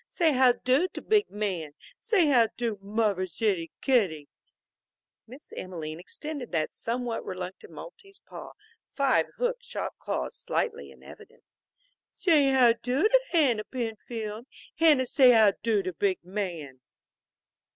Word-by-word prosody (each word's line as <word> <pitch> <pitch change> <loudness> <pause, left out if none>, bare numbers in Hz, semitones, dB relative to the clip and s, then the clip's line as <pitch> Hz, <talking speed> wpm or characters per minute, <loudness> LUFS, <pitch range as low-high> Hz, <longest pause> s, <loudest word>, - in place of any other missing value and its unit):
Say 330 -3 +2
how 255 -1 +5
do 260 +9 +1
to - - -5
big 425 -1 +2
man. 185 -8 -4 0.3
Say 425 -6 +2
how 250 -6 +4
do, 230 -3 -2
muvver's 200 -4 -1
ittie 190 -7 0
kittie." 200 - +1 1.0
Miss 260 +6 -14
Emelene 165 -4 -6
extended 285 - -7
the 160 -3 0
somewhat 240 0 -3
reluctant 185 - -7
Maltese 405 -5 -12
paw, - - -10 0.4
five 275 -2 +2
hook - - 0
shaped - - -6
claws - - -4
slightly 455 +1 -3
in - - -17
evidence. 440 +2 -15 0.7
"Say 315 -6 +3
how 255 -3 +5
do 255 +6 0
to - - +5
Hanna, 265 -11 +2
Penfield. 225 -1 -6 0.3
Hanna, 300 -5 +5
say 255 -1 +5
how 220 -3 +6
do 215 -3 +1
to 185 0 -4
big 190 +2 0
man." 175 -8 -5
235 Hz, 135 wpm, -27 LUFS, 195-285 Hz, 1.0 s, how